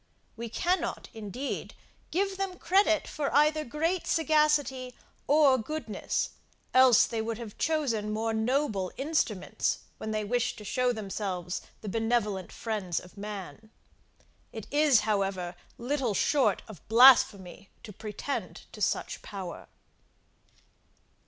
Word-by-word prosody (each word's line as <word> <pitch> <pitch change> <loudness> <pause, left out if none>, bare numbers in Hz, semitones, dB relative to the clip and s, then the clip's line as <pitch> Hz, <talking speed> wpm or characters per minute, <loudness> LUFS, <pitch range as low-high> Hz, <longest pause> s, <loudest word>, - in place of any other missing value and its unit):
We 230 0 -6
cannot, 355 - -1
indeed, 225 +5 -5 0.3
give 390 +2 0
them 385 -2 -3
credit 355 -4 +3
for 290 -2 -2
either 305 +1 +4
great 325 +7 -1
sagacity 300 -5 +2 0.3
or 285 -3 +5
goodness, 230 -4 -3 0.4
else 255 -3 +7
they 225 -1 -3
would 225 0 -3
have 225 -3 -9
chosen 265 -10 0
more 225 +1 -1
noble 220 -4 0
instruments, 270 - -1 0.2
when 220 - -5
they 215 0 -1
wished 245 +3 -1
to 210 - -9
show 250 +4 +1
themselves 195 -5 -4 0.2
the 215 - -8
benevolent 215 -3 -1
friends 205 -7 -3
of 180 - -15
man. 210 +1 -8 0.8
It 220 -3 -7
is, 290 -5 +5
however, 195 -4 -1 0.2
little 250 -3 -1
short 280 +7 +2
of 210 -9 -11
blasphemy 220 -6 +5
to 210 - -9
pretend 215 +8 -5
to - - -11
such - - -1
power. 190 -4 -7
230 Hz, 120 wpm, -29 LUFS, 210-290 Hz, 0.8 s, else